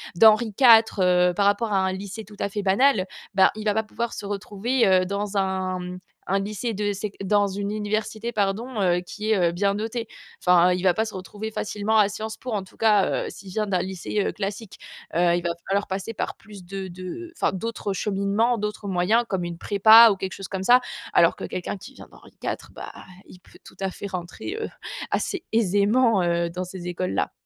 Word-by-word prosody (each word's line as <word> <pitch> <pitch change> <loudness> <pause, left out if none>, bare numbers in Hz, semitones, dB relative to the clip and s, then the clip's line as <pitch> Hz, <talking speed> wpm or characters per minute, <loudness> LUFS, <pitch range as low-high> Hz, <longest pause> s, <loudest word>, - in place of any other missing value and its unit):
d'Henri 220 +3 +5
IV, 230 -4 +8 0.2
heu, 180 -1 +4
par 200 - +2
rapport 205 +1 +1
à 195 - +3
un 190 0 +1
lycée 200 +3 -6
tout 205 0 -15
à 200 - -1
fait 205 +1 -3
banal, 200 +1 +3 0.3
bah, 190 -1 +5
il 215 0 -7
va 210 - +2
pas 220 - 0
pouvoir 235 +2 -4
se - - -6
retrouver, 210 +4 0
heu, 185 -1 +4
dans 200 +1 -3
un, 190 -1 -1
mmh, 180 0 -7 0.3
un 195 +1 +1
lycée 215 +3 -3
de 205 0 -1
sec 200 +1 -5
dans 205 +1 +3
une 200 +1 -3
université 215 +2 -2
pardon, 215 +3 -1
heu, 180 -2 +2
qui 210 +4 -4
est, 215 - +4
heu, - - -3
bien 200 +3 +1
notée. 225 +2 -4 0.3
Enfin, 180 0 +5
il 180 - -3
va 185 -2 +4
pas 220 - 0
se 220 - -7
retrouver 205 +4 -6
facilement 215 +1 -1
à 205 -1 +5
Sciences 220 +1 -6
Po 250 - -7
en 205 -3 -1
tout 190 - -19
cas, 210 -3 +3
heu, - - -5
s'il 195 -1 -11
vient 215 +3 -1
d'un 185 - +2
lycée, 190 +2 -3
heu, - - -1
classique. 200 +1 -5 0.4
Heu, 175 0 +3
il 175 - -1
va 175 - 0 0.2
falloir 200 +1 0
passer 190 +4 -4
par - - -3
plus 205 -3 -13
de 190 +1 -6
de 185 - -8
enfin - - +1
d'autres 210 0 -3
cheminements, 200 +4 0
d'autres 210 -1 -4
moyens 195 +6 +2
comme 190 -4 -2
une 170 -1 -5
prépa 220 +5 +7
ou - - 0
quelque 190 0 -5
chose 195 -2 -7
comme 190 -1 -4
ça, 245 +5 +6 0.3
alors - - +5
que - - -9
quelqu'un 185 +2 -4
qui 260 +8 -12
vient - - -12
d'Henri - - -17
IV, - - -1 0.2
bah, - - -9 0.3
il 180 - -14
peut - - -20
tout - - -15
à 195 - 0
fait 200 - -7
rentrer, 185 - -6
heu, - - -3 0.4
assez 385 -4 -2
aisément, 220 +1 +3
heu, 170 0 0
dans 180 +2 -4
ces 180 -1 -8
écoles-là. 180 +1 -2
200 Hz, 220 wpm, -24 LUFS, 185-220 Hz, 0.4 s, IV